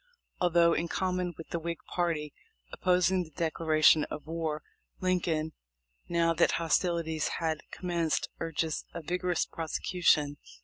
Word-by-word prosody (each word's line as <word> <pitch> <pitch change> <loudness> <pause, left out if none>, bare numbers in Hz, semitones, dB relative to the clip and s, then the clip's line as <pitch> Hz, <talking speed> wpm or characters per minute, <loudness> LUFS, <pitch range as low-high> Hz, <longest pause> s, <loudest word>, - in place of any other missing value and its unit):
Although, 170 -1 +4
in 170 - 0
common 180 -1 -1
with 165 - -9
the 170 - -2
Whig 170 +1 -3 0.2
party, 160 -4 -1 0.4
opposing 180 0 +3
the 170 - -7
declaration 155 -1 +3
of 150 - -7
war, 160 -2 -3 0.4
Lincoln, 165 -4 0 0.6
now 170 -1 +3
that - - +3
hostilities 165 -1 +1
had 160 -2 -1
commenced, 170 -3 -1
urges 165 -1 -2
a 170 - -5
vigorous 180 +1 0
prosecution. 160 -2 +1
165 Hz, 125 wpm, -30 LUFS, 160-175 Hz, 0.6 s, Although